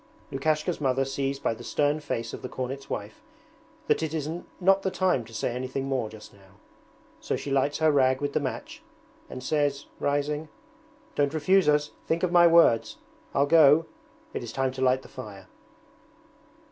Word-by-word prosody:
Lukashka's 155 Hz, +4 st, -1 dB
mother 135 Hz, -1 st, +1 dB
sees 135 Hz, 0 st, -2 dB
by 135 Hz, -, -1 dB
the 115 Hz, -, -11 dB
stern 145 Hz, +1 st, +1 dB
face 115 Hz, -6 st, -4 dB
of -, -, -7 dB
the 125 Hz, -, -6 dB
cornet's 135 Hz, +2 st, -5 dB
wife 105 Hz, +1 st, -6 dB, 0.6 s
that -, -, +2 dB
it 160 Hz, 0 st, -2 dB
is 150 Hz, -2 st, -2 dB, 0.3 s
not 195 Hz, +1 st, +4 dB
the 190 Hz, -, 0 dB
time 185 Hz, -8 st, +1 dB
to 115 Hz, -, -15 dB
say 115 Hz, +2 st, -2 dB
anything 130 Hz, +2 st, -3 dB
more 130 Hz, -5 st, -1 dB
just 110 Hz, 0 st, -13 dB
now, 100 Hz, -1 st, -20 dB, 0.6 s
so -, -, -2 dB
she 140 Hz, -, -5 dB
lights 140 Hz, +1 st, +1 dB
her 160 Hz, -1 st, +3 dB
rag 130 Hz, -2 st, +3 dB
with 145 Hz, -1 st, -2 dB
the -, -, +2 dB
match 135 Hz, -3 st, -5 dB, 0.5 s
and 130 Hz, -, -7 dB
says, 145 Hz, -1 st, 0 dB
rising: 145 Hz, +2 st, -1 dB, 0.6 s
'Don't 145 Hz, +1 st, 0 dB
refuse 185 Hz, +3 st, +3 dB
us, 150 Hz, 0 st, +2 dB, 0.2 s
think 165 Hz, +2 st, 0 dB
of 180 Hz, -, +1 dB
my 175 Hz, -1 st, +7 dB
words. 165 Hz, -9 st, +4 dB, 0.4 s
I'll 140 Hz, -, +4 dB
go, 155 Hz, 0 st, +6 dB, 0.5 s
it -, -, -3 dB
is 120 Hz, -, -6 dB
time 135 Hz, +2 st, 0 dB
to 130 Hz, 0 st, -7 dB
light 130 Hz, 0 st, +2 dB
the -, -, -12 dB
fire.' 105 Hz, -7 st, -10 dB
140 Hz, 180 wpm, -27 LUFS, 130-155 Hz, 0.6 s, my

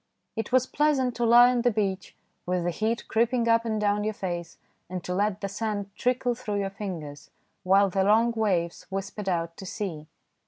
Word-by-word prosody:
It 225 Hz, 0 st, -4 dB
was 255 Hz, 0 st, +4 dB
pleasant 275 Hz, -4 st, +1 dB
to 240 Hz, -, +1 dB
lie 240 Hz, +2 st, +7 dB
on 245 Hz, -1 st, +1 dB
the 245 Hz, -, +3 dB
beach, 195 Hz, -4 st, -2 dB, 0.3 s
with 180 Hz, -1 st, 0 dB
the 175 Hz, -, 0 dB
heat 220 Hz, +6 st, -2 dB
creeping 235 Hz, +1 st, +1 dB
up 230 Hz, 0 st, +3 dB
and 220 Hz, -2 st, -1 dB
down 205 Hz, 0 st, +1 dB
your 215 Hz, 0 st, -2 dB
face, 175 Hz, -3 st, -5 dB, 0.3 s
and 180 Hz, -1 st, -5 dB
to 180 Hz, -, -3 dB
let 205 Hz, +1 st, 0 dB
the 200 Hz, -, -1 dB
sand 205 Hz, -1 st, -3 dB
trickle 250 Hz, 0 st, 0 dB
through 225 Hz, -4 st, -4 dB
your 195 Hz, 0 st, -3 dB
fingers, 170 Hz, -8 st, -7 dB, 0.3 s
while 195 Hz, +1 st, +4 dB
the 190 Hz, +1 st, +1 dB
long 225 Hz, +4 st, +4 dB
waves 190 Hz, -7 st, -1 dB
whispered 195 Hz, +1 st, -4 dB
out 170 Hz, -2 st, -1 dB
to 190 Hz, -, -8 dB
sea. 175 Hz, -8 st, -5 dB
205 Hz, 195 wpm, -27 LUFS, 190-230 Hz, 0.3 s, lie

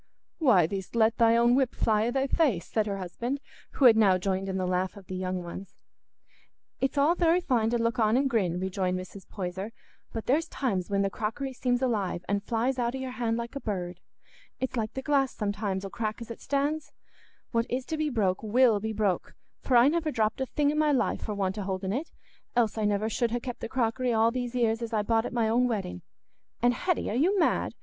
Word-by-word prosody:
"Why, 220 Hz, -, +5 dB
thee'st 190 Hz, +5 st, -5 dB
let 225 Hz, 0 st, +3 dB
thy 230 Hz, 0 st, +5 dB
own 235 Hz, +1 st, +4 dB
whip 260 Hz, -1 st, +2 dB
fly 215 Hz, 0 st, +2 dB
i' -, -, +1 dB
thy 270 Hz, +2 st, 0 dB
face," 270 Hz, -, +1 dB
said 215 Hz, -1 st, -1 dB
her 200 Hz, -1 st, -2 dB
husband, 235 Hz, +9 st, -4 dB, 0.3 s
who 275 Hz, -, +2 dB
had 235 Hz, -3 st, +9 dB
now 200 Hz, -4 st, +5 dB
joined 190 Hz, +1 st, -2 dB
in 190 Hz, -, -2 dB
the 185 Hz, -, -1 dB
laugh 185 Hz, +2 st, -1 dB
of 195 Hz, -, -12 dB
the 185 Hz, -, -7 dB
young 185 Hz, -1 st, -3 dB
ones. 180 Hz, +3 st, -8 dB, 1.0 s
"It's 270 Hz, +2 st, -1 dB
all 290 Hz, +4 st, +4 dB
very 345 Hz, 0 st, +3 dB
fine 240 Hz, -10 st, +1 dB
to 240 Hz, -, +1 dB
look 230 Hz, +2 st, 0 dB
on 220 Hz, +1 st, +3 dB
and 275 Hz, +1 st, +2 dB
grin," 190 Hz, -9 st, 0 dB
rejoined 185 Hz, -1 st, -1 dB
Mrs. 185 Hz, +1 st, -9 dB
Poyser; 190 Hz, +2 st, -5 dB, 0.4 s
"but 225 Hz, -, -5 dB
there's 300 Hz, +6 st, +2 dB
times 200 Hz, -9 st, -2 dB
when 200 Hz, 0 st, +1 dB
the 195 Hz, -, 0 dB
crockery 230 Hz, +7 st, -3 dB
seems 245 Hz, 0 st, 0 dB
alive 200 Hz, -8 st, -1 dB
an' 200 Hz, 0 st, +1 dB
flies 240 Hz, +5 st, -1 dB
out 240 Hz, +1 st, 0 dB
o' -, -, -2 dB
your 260 Hz, -1 st, -4 dB
hand 235 Hz, -2 st, -1 dB
like 235 Hz, +3 st, -5 dB
a -, -, -2 dB
bird. 180 Hz, -6 st, -4 dB, 0.6 s
It's 260 Hz, 0 st, -2 dB
like 220 Hz, -3 st, -1 dB
the 265 Hz, -, -4 dB
glass, 275 Hz, -2 st, +1 dB
sometimes, 200 Hz, -2 st, -2 dB
'ull 195 Hz, -, -7 dB
crack 215 Hz, -2 st, -3 dB
as 235 Hz, -1 st, -8 dB
it 230 Hz, -, -9 dB
stands. 290 Hz, +2 st, -1 dB, 0.6 s
What 230 Hz, 0 st, +1 dB
is 250 Hz, +1 st, -2 dB
to 320 Hz, -, -3 dB
be 310 Hz, -1 st, 0 dB
broke 200 Hz, -8 st, 0 dB
will 220 Hz, 0 st, +4 dB
be 220 Hz, +2 st, -3 dB
broke, 205 Hz, -4 st, -1 dB, 0.3 s
for 250 Hz, -, +3 dB
I 240 Hz, +2 st, +7 dB
never 320 Hz, +1 st, +1 dB
dropped 225 Hz, -2 st, 0 dB
a 265 Hz, -, -1 dB
thing 290 Hz, +2 st, +1 dB
i' -, -, -2 dB
my 305 Hz, 0 st, +2 dB
life 270 Hz, -, +1 dB
for 210 Hz, -, -3 dB
want 195 Hz, 0 st, -1 dB
o' -, -, -2 dB
holding 190 Hz, 0 st, -2 dB
it, 290 Hz, +8 st, -3 dB, 0.5 s
else 230 Hz, -3 st, +2 dB
I 220 Hz, -, -2 dB
should 210 Hz, -, +2 dB
never 205 Hz, +1 st, 0 dB
ha' 235 Hz, +1 st, 0 dB
kept 245 Hz, 0 st, -6 dB
the -, -, -5 dB
crockery 245 Hz, 0 st, 0 dB
all 225 Hz, +1 st, +3 dB
these 245 Hz, 0 st, -3 dB
'ears 230 Hz, -2 st, +1 dB
as 230 Hz, -1 st, -4 dB
I 210 Hz, -1 st, +1 dB
bought 225 Hz, +2 st, +1 dB
at -, -, -7 dB
my 235 Hz, -2 st, +1 dB
own 240 Hz, +3 st, +3 dB
wedding. 195 Hz, -, -3 dB, 0.6 s
And 245 Hz, +2 st, +3 dB
Hetty, 355 Hz, -, -1 dB
are -, -, -2 dB
you 355 Hz, +11 st, +3 dB
mad? 335 Hz, -, +1 dB
230 Hz, 235 wpm, -28 LUFS, 200-255 Hz, 1.0 s, had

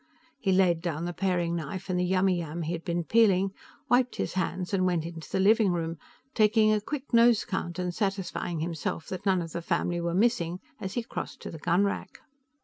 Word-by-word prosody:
He 195 Hz, -7 st, +1 dB
laid 185 Hz, -3 st, +3 dB
down 165 Hz, -1 st, -2 dB
the 175 Hz, -, -3 dB
paring 175 Hz, -3 st, 0 dB
knife 170 Hz, +3 st, -5 dB
and 180 Hz, -1 st, 0 dB
the -, -, +2 dB
yummiyam 175 Hz, -4 st, +1 dB
he 160 Hz, -, -2 dB
had 165 Hz, -1 st, -5 dB
been 170 Hz, 0 st, -1 dB
peeling, 195 Hz, -2 st, +3 dB, 0.3 s
wiped 245 Hz, +1 st, +3 dB
his -, -, -2 dB
hands 185 Hz, 0 st, -2 dB
and 190 Hz, -1 st, +2 dB
went 170 Hz, -3 st, 0 dB
into 165 Hz, -1 st, -8 dB
the -, -, -1 dB
living 210 Hz, 0 st, +4 dB
room, 165 Hz, -2 st, -2 dB, 0.3 s
taking 215 Hz, 0 st, +4 dB
a 210 Hz, -, +1 dB
quick 275 Hz, +4 st, -6 dB
nose 235 Hz, -1 st, +5 dB
count 175 Hz, -3 st, -3 dB
and 180 Hz, -1 st, -2 dB
satisfying 195 Hz, -4 st, -2 dB
himself 165 Hz, -1 st, -3 dB
that 190 Hz, +2 st, -5 dB
none 185 Hz, -2 st, +3 dB
of 165 Hz, -, -8 dB
the 170 Hz, -, -4 dB
family 175 Hz, +1 st, -1 dB
were 170 Hz, 0 st, -1 dB
missing 185 Hz, -5 st, +1 dB, 0.2 s
as 190 Hz, -1 st, -5 dB
he 240 Hz, -, -1 dB
crossed -, -, -6 dB
to -, -, -6 dB
the 160 Hz, -, -8 dB
gunrack. 190 Hz, +6 st, 0 dB
180 Hz, 205 wpm, -28 LUFS, 170-200 Hz, 0.3 s, nose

